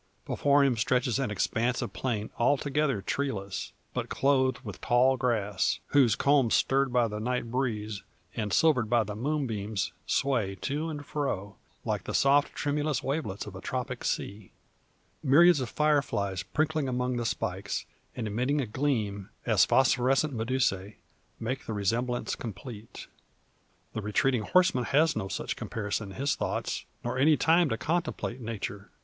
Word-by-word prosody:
Before 140 0 +3
him 130 -4 +2
stretches 125 +2 +1
an 135 - 0
expanse 115 +5 0
of - - -4
plain 110 -5 -2
altogether 140 -2 +1
treeless, 100 -7 -3 0.2
but - - -3
clothed 130 -1 +2
with 105 -7 -8
tall 125 +2 +4
grass, 105 -6 0
whose 130 -6 +4
culms 140 -3 +3
stirred 135 0 +2
by 120 -1 +3
the 105 -1 -5
night 120 +1 -2
breeze, 110 -5 -2 0.3
and 105 -2 -2
silvered 130 -8 +3
by 120 -2 +4
the 105 0 -6
moonbeams, 110 - -2
sway 120 -8 +1
to 150 +4 -2
and 145 -2 -6
fro, 100 -9 -3 0.3
like - - -2
the - - -3
soft 140 +1 +3
tremulous 145 0 -1
wavelets 135 -9 -2
of - - -9
a - - -8
tropic - - -4
sea; 100 0 -3 0.7
myriads 155 +4 +6
of 125 - -3
fire 150 -1 +3
flies 100 -8 -2
prinkling 150 +8 -1
among 125 0 -1
the 120 - -1
spikes, 95 -1 -2 0.3
and 120 - -3
emitting 125 +8 0
a 135 - 0
gleam, 105 -5 -1 0.2
as - - +5
phosphorescent 135 +2 +3
medusae, 110 -4 -1 0.4
make 130 +4 -4
the 110 - -2
resemblance 120 +5 -1
complete. 110 0 -8 0.9
The 110 - -3
retreating 110 +4 +1
horseman 130 - +3
has 155 +4 +3
no 95 - -2
such - - -3
comparison 105 -2 -3
in - - -12
his 140 +3 +1
thoughts, - - -3 0.2
nor 120 +2 -2
any 150 +2 +5
time 165 0 +4
to 115 - -1
contemplate 155 -5 -2
Nature. 105 -2 -5
125 Hz, 155 wpm, -29 LUFS, 105-140 Hz, 0.9 s, myriads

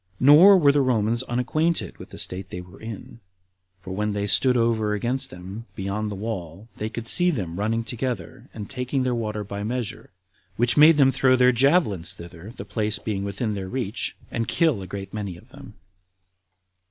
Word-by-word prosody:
Nor 160 +9 +8
were 145 -5 +5
the 145 0 +2
Romans 115 -2 +1
unacquainted 130 +7 -1
with - - -11
the - - -11
state 95 +1 -2
they 90 - -6
were 90 +2 -13
in, 110 +1 -9 0.6
for 95 -1 -7
when 105 +2 -1
they 100 0 -2
stood 125 +5 +4
over 110 -2 +1
against 120 +5 -2
them, 95 +6 -9
beyond 100 +2 -3
the 105 - -5
wall, 95 -2 -6
they 110 - -3
could 115 0 -7
see 180 +8 +5
them 95 - -3
running 115 +2 0
together, 120 -6 -5
and 105 -3 -8
taking 130 +1 -2
their 125 -1 0
water 110 -3 -3
by 100 0 -6
measure, 115 0 -4 0.5
which 120 +3 +1
made 155 +1 +7
them 135 -2 +5
throw 130 0 +3
their 125 0 +5
javelins 120 - +2
thither 85 +1 -11
the - - -7
place 105 -1 -1
being 105 -2 -4
within 100 +2 -3
their 95 -2 -5
reach, 120 -3 -3 0.2
and 115 -1 -2
kill 145 -3 +1
a 95 - -8
great 95 0 -7
many 100 -5 -5
of 115 +8 -18
them. 135 -5 -13
110 Hz, 190 wpm, -24 LUFS, 100-130 Hz, 0.6 s, Nor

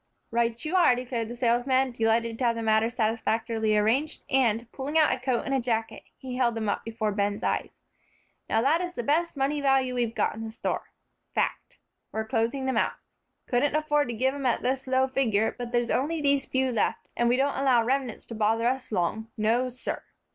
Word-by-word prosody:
"Right 235 +1 0
you 320 +4 -1
are," 340 -9 +5
declared 245 -2 -3
the 240 - -7
salesman, 250 +2 +2
delighted 230 0 0
to 255 - +1
have 235 -1 +2
the 230 - -4
matter 220 +1 +3
satisfactorily 225 -1 0
arranged, 255 +9 +1
and, 235 -4 +2
pulling 285 +3 -2
out 310 -4 +5
a - - -11
coat 255 -1 0
and 270 -2 0
jacket, 225 -2 -2 0.2
he 255 -1 -7
held 240 -2 +2
them 220 -1 -2
up 205 - -1
before 220 -1 -2
Ben's 205 0 -1
eyes. - - -2 0.7
"Now 225 +1 +2
that 310 +6 +3
is 355 0 -4
the 240 - -3
best 315 +5 +1
money 280 +2 0
value 270 -2 +2
we've 235 -2 -1
got - - +1
in 225 - -7
the 225 - -5
store. 220 - -4 0.5
Fact. - - -2 0.3
We're 220 0 -3
closing 230 +5 -1
them 265 - 0
out. - - +2 0.5
Couldn't 265 +4 +1
afford 295 -2 +2
to 240 - -4
give 260 +4 +1
'em 280 -2 -2
at 240 - 0
this 260 +1 -1
low 260 0 +3
figure, 225 -5 +1
but 245 -1 -6
there's 240 -1 0
only 315 +5 0
these 280 -2 +2
few 260 0 +1
left, 230 - -1
and 240 0 +2
we 245 - +3
don't 275 +1 +1
allow 260 -4 +3
remnants 255 -1 -1
to - - -8
bother 225 +1 +1
us 255 0 -1
long, 215 +3 -1
no, 230 +4 +1
sir." 250 0 -4
245 Hz, 205 wpm, -27 LUFS, 225-270 Hz, 0.7 s, are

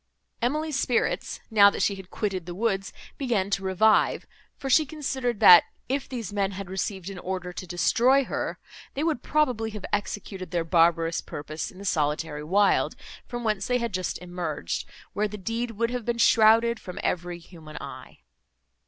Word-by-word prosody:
Emily's 300 +4 0
spirits, 245 -3 0
now 200 -2 +8
that - - -2
she 200 - +2
had 190 -1 -10
quitted 190 -5 -3
the 175 - -6
woods, 195 -1 -1 0.3
began 220 -8 0
to 195 -1 0
revive; 190 +3 +3 0.3
for 270 - -6
she 290 +4 +5
considered, 265 -6 -3
that, 175 - +10 0.2
if 270 +1 -2
these 230 -6 -5
men 200 -1 0
had 190 -1 -7
received 190 0 -3
an 190 - -8
order 180 -1 -4
to 185 - -7
destroy 240 +10 +3
her, - - -3 0.4
they 285 - -1
would 315 -7 0
probably 250 -8 +1
have 210 -2 -7
executed 200 -2 -3
their 170 -1 -1
barbarous 165 0 +2
purpose 155 +2 -6
in 185 - -15
the 200 - -9
solitary 150 -2 -1
wild, 195 +6 +2 0.3
from 240 0 -5
whence 215 -4 -1
they 250 - +2
had 235 -3 -3
just 185 0 -2
emerged, 175 - -4 0.2
where 210 +1 0
the 210 +1 -7
deed 230 +5 -3
would 230 +1 -1
have 250 -1 -3
been 235 +1 -1
shrouded 230 0 +5
from 180 - -9
every 175 0 -2
human 165 -3 -12
eye. - - -10
200 Hz, 175 wpm, -26 LUFS, 180-235 Hz, 0.4 s, that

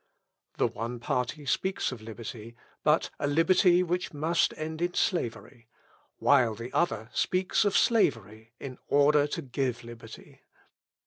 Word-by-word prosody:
The - - +2
one 115 +2 -4
party 125 +5 -2
speaks 190 +7 -1
of 125 -4 -8
liberty, 115 +1 -8 0.3
but 150 +1 +2
a 145 - 0
liberty 175 +4 +4
which 180 -2 -3
must 160 +3 +1
end 155 +1 -5
in 175 +1 -1
slavery; 120 -6 -2 0.5
while 120 -6 +3
the 115 +3 -8
other 115 -9 0
speaks 185 - +1
of 205 - +3
slavery, 110 - +1
in 130 -2 -8
order 145 +1 +4
to - - -4
give 125 -2 -2
liberty. 115 -1 -12
140 Hz, 135 wpm, -28 LUFS, 115-165 Hz, 0.5 s, liberty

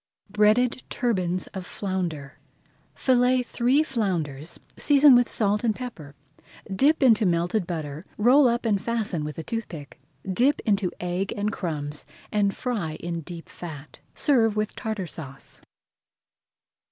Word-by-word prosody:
BREADED 220 +4 +3
TURBANS 185 -7 -1
OF 190 - -5
FLOUNDER 175 -8 -4 0.6
Fillet 250 0 +3
three 250 +5 +2
flounders, 175 - -3 0.2
season 285 -1 +6
with 245 -1 +5
salt 210 0 +1
and 220 -3 +1
pepper, 165 - -8 0.6
dip 290 +7 +3
into 225 -4 +5
melted 175 +1 +1
butter, 155 -2 -5
roll 255 +6 +6
up 235 0 0
and 205 -4 +1
fasten 215 -8 -2
with 150 0 -6
a 165 - -5
toothpick. 170 - -6 0.3
Dip 245 +10 +2
into 200 -3 +1
egg 180 +2 -2
and 210 +1 -1
crumbs 150 -4 -4 0.3
and 200 -1 +1
fry 210 -11 -2
in 170 0 -4
deep 170 +1 -9
fat. 155 -4 -10 0.2
Serve 225 -7 +3
with 215 0 -2
Tartar 215 -4 -3
Sauce. 140 -5 -9
200 Hz, 130 wpm, -25 LUFS, 170-235 Hz, 0.6 s, season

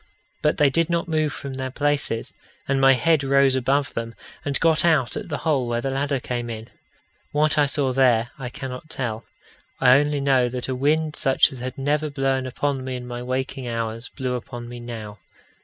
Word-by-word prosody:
But 150 - +2
they 145 -2 +4
did 165 +4 +1
not 170 0 0
move 155 -2 +1
from 135 0 -6
their 130 0 -3
places, 145 -4 0 0.3
and 135 0 +1
my 135 0 +7
head 145 +4 +2
rose 135 0 +4
above 135 +2 +1
them, 115 0 -4 0.3
and 140 -1 -1
got 165 -1 +3
out 155 -9 +3
at - - -5
the 150 - -2
hole 140 -6 +2
where 120 0 0
the 135 +2 -2
ladder 140 0 0
came 120 -1 -4
in. 110 0 -7 0.6
What 150 +1 +2
I 145 - +4
saw 140 -2 0
there, 125 -3 +3
I 125 -2 -4
cannot 130 +3 -7
tell. 115 -6 -4 0.5
I 130 +1 +7
only 145 0 0
know 135 -3 +3
that 125 0 -4
a 130 - -1
wind 150 +4 +1
such 135 +2 +3
as 130 - -9
had 125 +1 -5
never 150 +3 0
blown 135 -2 0
upon 135 +1 -2
me 130 0 -4
in 125 0 -6
my 120 0 -6
waking 130 +1 -3
hours, 115 0 -3
blew 130 -2 -3
upon 120 -1 -6
me 120 0 -8
now. 110 -3 -7
135 Hz, 205 wpm, -23 LUFS, 125-145 Hz, 0.6 s, my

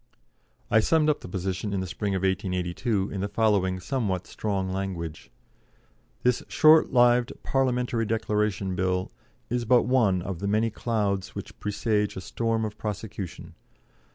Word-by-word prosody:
I 110 - +6
summed 155 +6 +3
up 150 - -3
the - - -9
position 95 +3 -3
in 100 - 0
the 95 - -2
spring 100 +2 -2
of 95 - -1
1882 95 +2 -1
in 95 - -3
the 100 - -1
following 100 -3 +1
somewhat 95 -5 -2
strong 95 -3 -2
language: 90 -5 -4 0.9
"This 125 0 +2
short 155 0 +5
lived 120 -1 +4
'Parliamentary 125 -3 0
Declaration 105 -4 0
Bill' 90 0 -1 0.4
is 120 0 0
but 120 +1 +4
one 110 -8 +2
of 95 -3 -4
the 100 - -2
many 110 +2 +1
clouds 100 -5 -1
which - - -8
presage 105 0 0
a - - -4
storm 115 +3 -1
of 105 - -7
prosecution. 100 -6 -6
105 Hz, 150 wpm, -26 LUFS, 95-115 Hz, 0.9 s, I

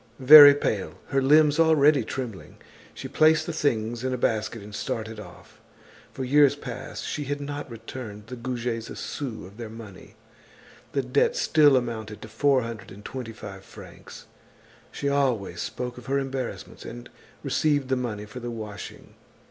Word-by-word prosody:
Very 145 +1 +10
pale, 95 - -2
her 135 - +1
limbs 150 +2 +4
already 155 -4 +5
trembling, 115 -4 -7 0.3
she 135 - -8
placed 155 +3 +3
the 170 - -4
things 120 -6 -1
in 130 0 -1
a - - -4
basket 110 -2 -1
and 105 0 -11
started 110 +1 -4
off. - - -14 0.5
For 135 - -5
years 145 +2 +4
past 130 -3 -7
she 150 - -4
had 145 +1 -3
not 145 0 -6
returned 115 -2 -9
the 125 +3 -8
Goujets 120 -2 -4
a - - -8
sou 125 -9 -6
of 100 +3 -14
their 115 -2 -7
money. 110 -4 -12 0.8
The 140 - 0
debt 125 +3 +1
still 145 -4 +4
amounted 110 -3 -4
to - - -8
four 130 +4 +2
hundred 115 -2 -8
and 100 +2 -13
twenty 125 -4 -6
five 95 -3 -10
francs. - - -13 0.7
She 140 - -4
always 125 -11 0
spoke 125 0 -5
of 125 - -15
her 135 +1 +1
embarrassments 135 -1 -5
and - - -9 0.4
received 145 -4 0
the 130 - +2
money 115 -5 -4
for 105 +4 -9
the 120 0 -5
washing. 110 -3 -8
125 Hz, 165 wpm, -25 LUFS, 110-140 Hz, 0.8 s, Very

